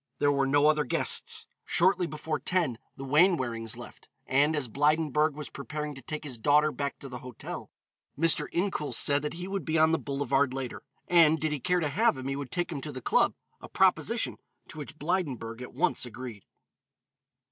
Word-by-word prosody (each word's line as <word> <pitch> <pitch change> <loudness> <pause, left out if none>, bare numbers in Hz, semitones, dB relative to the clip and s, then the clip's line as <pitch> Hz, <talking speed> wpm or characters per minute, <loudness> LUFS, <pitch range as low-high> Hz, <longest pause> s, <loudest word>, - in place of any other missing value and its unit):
There 145 - +3
were 140 -1 +1
no 145 +2 +4
other 150 0 +4
guests. 130 - 0 0.2
Shortly 180 0 +2
before 155 0 -3
ten 165 -11 0 0.2
the 135 - -7
Wainwarings 130 - +2
left, - - -12 0.2
and 145 +4 +3
as 145 -4 -1
Blydenburg 150 +3 +2
was 150 -2 -7
preparing 150 +1 -5
to 135 - -10
take 155 +4 -5
his 130 -6 -6
daughter 150 +5 +4
back 140 -1 -3
to 140 - -6
the 125 -2 -7
hotel, 125 -2 -8 0.5
Mr. 160 -1 +4
Incoul 175 -5 -1
said 145 0 +2
that 150 +2 -4
he 175 +2 -5
would 195 0 -3
be 160 0 0
on 160 0 +5
the 165 - +2
boulevard 140 -1 0
later, 130 -2 -5 0.3
and 160 -2 +5
did 155 -1 0
he 150 - -2
care 180 +6 +1
to 155 - +1
have 140 - +2
him 130 0 -5
he 135 - -1
would 140 -2 -5
take 175 -1 -1
him 145 -4 -4
to 150 - -5
the 130 - -6
club, - - +2 0.3
a - - -10
proposition - - +1 0.3
to 155 - -9
which 150 +1 -8
Blydenburg 140 -9 -2
at 125 - -7
once - - +1
agreed. 120 -3 -8
150 Hz, 195 wpm, -29 LUFS, 135-160 Hz, 0.5 s, on